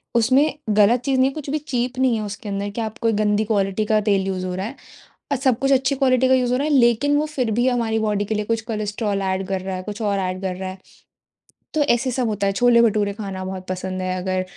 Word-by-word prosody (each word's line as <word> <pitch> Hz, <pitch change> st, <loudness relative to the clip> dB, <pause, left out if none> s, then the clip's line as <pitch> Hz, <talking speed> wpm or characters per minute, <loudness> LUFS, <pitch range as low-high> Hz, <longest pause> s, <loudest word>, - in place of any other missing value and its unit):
उसमें 260 Hz, +6 st, +3 dB, 0.2 s
गलत 215 Hz, +3 st, +4 dB
चीज़ 270 Hz, -1 st, +1 dB
नहीं 260 Hz, +1 st, +4 dB
है, -, -, -9 dB
कुछ 295 Hz, -2 st, -7 dB
भी 305 Hz, -, 0 dB
चीप 255 Hz, -3 st, -3 dB
नहीं 255 Hz, -3 st, +3 dB
है 220 Hz, -, -2 dB
उसके 205 Hz, +1 st, -6 dB
अंदर 200 Hz, +1 st, -3 dB
कि 230 Hz, -, -2 dB
आप 220 Hz, +1 st, -4 dB
कोई 230 Hz, -2 st, +1 dB
गंदी 210 Hz, 0 st, +1 dB
क्वालिटी 200 Hz, -1 st, 0 dB
का 215 Hz, 0 st, +2 dB
तेल 200 Hz, -2 st, +1 dB
यूज़ 185 Hz, -1 st, -2 dB
हो 180 Hz, -, -3 dB
रहा 190 Hz, -, -3 dB
है। 240 Hz, +5 st, -6 dB, 0.6 s
अ, -, -, +3 dB
सब 255 Hz, -2 st, +1 dB
कुछ 275 Hz, +1 st, +1 dB
अच्छी 265 Hz, +1 st, +2 dB
क्वालिटी 260 Hz, -1 st, +3 dB
का 260 Hz, -, +4 dB
यूज़ 250 Hz, -2 st, +2 dB
हो 250 Hz, -, +2 dB
रहा 285 Hz, +3 st, -1 dB
है 300 Hz, -, +1 dB
लेकिन 255 Hz, +3 st, +3 dB
वो 300 Hz, -, +1 dB
फिर 260 Hz, -7 st, -2 dB
भी 250 Hz, -, +3 dB
हमारी 230 Hz, -3 st, +1 dB
बॉडी 205 Hz, -1 st, 0 dB
के 215 Hz, +1 st, -2 dB
लिए 210 Hz, -, -2 dB
कुछ 225 Hz, +1 st, -1 dB
कोलेस्ट्रॉल 210 Hz, -1 st, -2 dB
एड 190 Hz, 0 st, -1 dB
कर 190 Hz, -1 st, -2 dB
रहा 190 Hz, 0 st, -4 dB
है, 185 Hz, -, -5 dB
कुछ 210 Hz, +2 st, -7 dB
और 200 Hz, -2 st, 0 dB
एड 185 Hz, 0 st, -3 dB
कर 185 Hz, -1 st, -2 dB
रहा 190 Hz, 0 st, -5 dB
है। 185 Hz, -, -8 dB, 1.0 s
तो 310 Hz, -, +2 dB
ऐसे 255 Hz, -2 st, +1 dB
सब 245 Hz, -1 st, -1 dB
होता 205 Hz, -2 st, -1 dB
है 195 Hz, -, +2 dB
छोले-भटूरे 220 Hz, -2 st, +3 dB
खाना 195 Hz, -3 st, -6 dB
बहुत 185 Hz, 0 st, -6 dB
पसंद 185 Hz, 0 st, -4 dB
है 185 Hz, 0 st, -2 dB
अगर 185 Hz, 0 st, -1 dB
215 Hz, 265 wpm, -21 LUFS, 195-255 Hz, 1.0 s, गलत